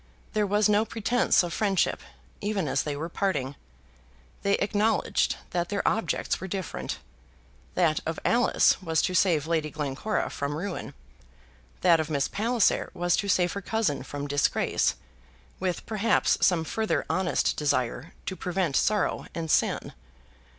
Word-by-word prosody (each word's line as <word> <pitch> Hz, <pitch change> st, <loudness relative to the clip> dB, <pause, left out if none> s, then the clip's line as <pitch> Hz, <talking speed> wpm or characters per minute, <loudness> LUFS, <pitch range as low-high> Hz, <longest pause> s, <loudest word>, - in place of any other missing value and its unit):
There 210 Hz, -2 st, +1 dB
was 205 Hz, +2 st, +3 dB
no 210 Hz, 0 st, +3 dB
pretence 225 Hz, +1 st, +2 dB
of 170 Hz, -1 st, -4 dB
friendship, 195 Hz, -5 st, +1 dB, 0.4 s
even 200 Hz, -5 st, -1 dB
as 135 Hz, -, +1 dB
they 150 Hz, -1 st, -3 dB
were 160 Hz, +3 st, -3 dB
parting. 150 Hz, -7 st, -1 dB, 0.9 s
They 200 Hz, 0 st, +2 dB
acknowledged 210 Hz, +1 st, +1 dB, 0.2 s
that 175 Hz, -1 st, -1 dB
their 200 Hz, -1 st, -1 dB
objects 225 Hz, -, 0 dB
were 190 Hz, -, -4 dB
different. 190 Hz, -2 st, -4 dB, 0.8 s
That 165 Hz, -4 st, +3 dB
of 160 Hz, 0 st, -3 dB
Alice 240 Hz, -3 st, +3 dB
was 165 Hz, -3 st, +1 dB
to 185 Hz, -, 0 dB
save 170 Hz, -6 st, +3 dB
Lady 160 Hz, -2 st, 0 dB
Glencora 150 Hz, +8 st, -2 dB
from 140 Hz, +1 st, -3 dB
ruin. 180 Hz, +3 st, -5 dB, 0.9 s
That 170 Hz, -2 st, +5 dB
of 160 Hz, 0 st, -2 dB
Miss 140 Hz, -3 st, +1 dB
Palliser 230 Hz, 0 st, +1 dB
was 175 Hz, -1 st, +2 dB
to 200 Hz, -, -1 dB
save 180 Hz, -1 st, +2 dB
her 200 Hz, -, -4 dB
cousin 200 Hz, -9 st, -1 dB
from 145 Hz, +2 st, -6 dB
disgrace, 145 Hz, 0 st, +1 dB, 0.6 s
with 185 Hz, -2 st, -2 dB
perhaps 220 Hz, +1 st, +2 dB
some 175 Hz, -3 st, +3 dB
further 220 Hz, +6 st, -1 dB
honest 185 Hz, -1 st, +1 dB
desire 135 Hz, 0 st, -1 dB
to 190 Hz, -, -3 dB
prevent 180 Hz, -5 st, -1 dB
sorrow 210 Hz, -1 st, +1 dB
and 160 Hz, -2 st, -2 dB
sin. -, -, +1 dB
180 Hz, 145 wpm, -27 LUFS, 155-205 Hz, 0.9 s, That